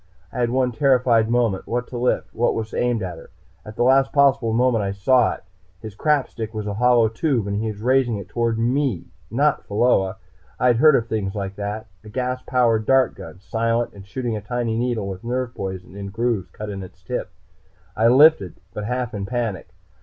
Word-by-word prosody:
I - - -4
had 120 -1 +1
one 130 0 +1
terrified 125 -4 +3
moment 115 -5 0
what 120 +1 -1
to 125 - -6
lift? 125 - 0
What 120 - +1
was 110 -1 -4
aimed 120 -4 0
at 90 -3 -5
her? - - -14 0.3
At 105 - -10
the - - +1
last 135 +1 +4
possible 135 -5 +3
moment 120 -1 +2
I 100 0 -2
saw 125 +5 +3
it. - - -12 0.4
His 110 +1 -8
crap 150 +5 +1
stick 110 -1 -7
was 105 -1 -3
a 105 - -3
hollow 120 +1 +4
tube, 115 0 0
and 100 +1 -2
he 110 - -2
was 105 0 -6
raising 125 -3 +2
it 100 -2 -8
toward 115 +2 -1
me, 125 - 0 0.2
not 140 +5 +1
toward 110 +5 +2
Pheola. 95 0 -4 0.4
I'd 125 -2 +3
heard 150 +3 +6
of 115 - +1
things 105 -3 -2
like 100 -1 -4
that 105 +2 -4 0.2
a 105 - -11
gas 125 +2 -2
powered 115 -4 +2
dart 135 -1 +4
gun. 95 -1 -11
Silent, 115 +3 -1
and 100 - -12
shooting 120 +3 -4
a 105 - -4
tiny 115 +1 -2
needle 115 -3 -1
with 95 +1 -6
a - - -8
nerve 125 -1 -2
poison 95 -1 -6
in 100 -1 -6
grooves 115 -2 -1
cut 105 -1 -7
in 100 -1 -6
its 95 0 -12
tip. - - -4 0.7
I 115 - +3
lifted, 130 - +5 0.2
but 105 - -5
half 125 +1 -2
in 100 -2 -4
panic. 115 -7 -3
115 Hz, 215 wpm, -22 LUFS, 105-125 Hz, 0.7 s, heard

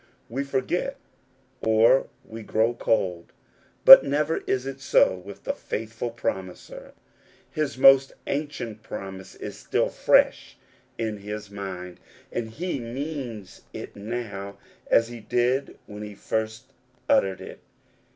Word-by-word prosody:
We 135 +5 -2
forget, 140 - -2 0.6
or 115 +4 +4 0.2
we 115 +1 -9
grow 110 +2 +1
cold; 90 -7 -1 0.5
but - - +13
never 150 +3 0
is 130 0 0
it 135 0 -6
so 130 - +4
with 95 +2 -11
the - - -1
Faithful 115 +2 -5
Promiser. 95 -5 -5 0.6
His 150 -4 -2
most 135 0 +6
ancient 140 -7 -4
promise 95 -3 -8
is - - -8
still - - 0
fresh - - +2 0.4
in 110 -2 -2
his 105 0 -7
mind, 90 -3 -7 0.3
and 115 -2 -3
he 165 +5 -3
means 120 -4 -6
it - - -8
now 100 -2 -5 0.3
as 115 0 +4
he 120 -1 -8
did 125 +5 0
when 105 0 -9
he 105 -1 -7
first 110 +5 -4 0.3
uttered 95 -1 +3
it. - - -10
115 Hz, 125 wpm, -25 LUFS, 105-130 Hz, 0.6 s, but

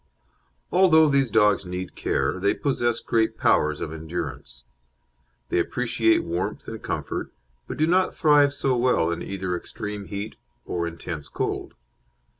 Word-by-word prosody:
Although 160 -5 +6
these 135 -3 +2
dogs 105 -1 +4
need 90 0 -6
care, 70 +7 0
they 100 +2 +2
possess 120 -4 0
great 110 0 0
powers 75 0 +2
of 80 - -4
endurance. 80 -6 -6 0.9
They - - +1
appreciate 115 +3 +1
warmth 90 +5 -3
and 110 -1 -6
comfort, - - -4 0.4
but - - -5
do 155 - +3
not 185 +3 +3
thrive 145 -3 +4
so 135 -2 0
well 120 -9 +2
in 85 0 -3
either 95 -2 -3
extreme 105 +3 -6
heat 100 +3 -6 0.3
or 85 -1 -2
intense 85 -2 -6
cold. - - -3
105 Hz, 140 wpm, -25 LUFS, 85-130 Hz, 0.9 s, Although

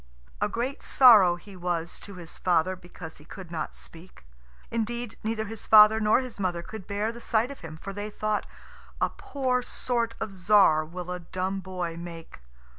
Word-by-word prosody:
A - - +2
great 250 +4 -3
sorrow 215 -9 +7
he 195 +3 -13
was 175 -2 -3
to 200 - -11
his 175 -2 -9
father 180 +1 +2
because 175 -2 -11
he - - -15
could 175 +2 -11
not 160 -2 -4
speak. 165 - -14 0.5
Indeed, 230 0 -3
neither 220 0 -2
his 220 0 -8
father 215 0 +8
nor 215 +3 +3
his 250 -5 -9
mother 175 -3 -1
could 215 0 -9
bear 205 +2 -1
the 235 +1 -11
sight 230 +3 +1
of 280 - -10
him, 160 -1 -9
for 195 +5 -7
they 205 +1 -5
thought, 215 0 -2 0.5
"A - - +1
poor 255 -3 -1
sort 235 -2 -1
of 220 -2 -4
Tzar 185 -4 +4
will 180 +2 -7
a 180 - -3
dumb 185 +3 -3
boy 180 -3 -5
make!" 170 -1 -9
195 Hz, 185 wpm, -27 LUFS, 175-220 Hz, 0.5 s, father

